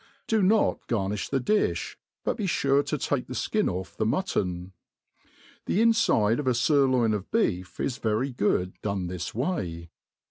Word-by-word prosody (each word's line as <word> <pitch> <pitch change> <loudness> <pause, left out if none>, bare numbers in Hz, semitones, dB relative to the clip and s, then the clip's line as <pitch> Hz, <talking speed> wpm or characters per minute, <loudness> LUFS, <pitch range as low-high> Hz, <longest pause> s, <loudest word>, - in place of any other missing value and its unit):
Do 220 -1 +2
not 205 +3 +2
garni& 100 -4 -1
the 135 - +1
difli, 210 - 0 0.3
but - - 0
be 210 -4 -2
fufe 140 -4 +2
to 150 - -1
fake 135 -1 -1
the 130 - -6
flcin 215 - 0
off 95 0 -5
the 110 - -1
mutton. 95 - -1 0.9
The 190 - +1
infide 220 - +3
of 145 - -3
a 125 - +3
furloin 130 -4 +3
of 105 -2 -4
beef 90 - -1
is 125 -2 -2
very 110 +5 0
good 95 -5 0
done 100 -3 -2
this 90 +1 -5
way. 90 - -3
120 Hz, 165 wpm, -27 LUFS, 95-150 Hz, 0.9 s, infide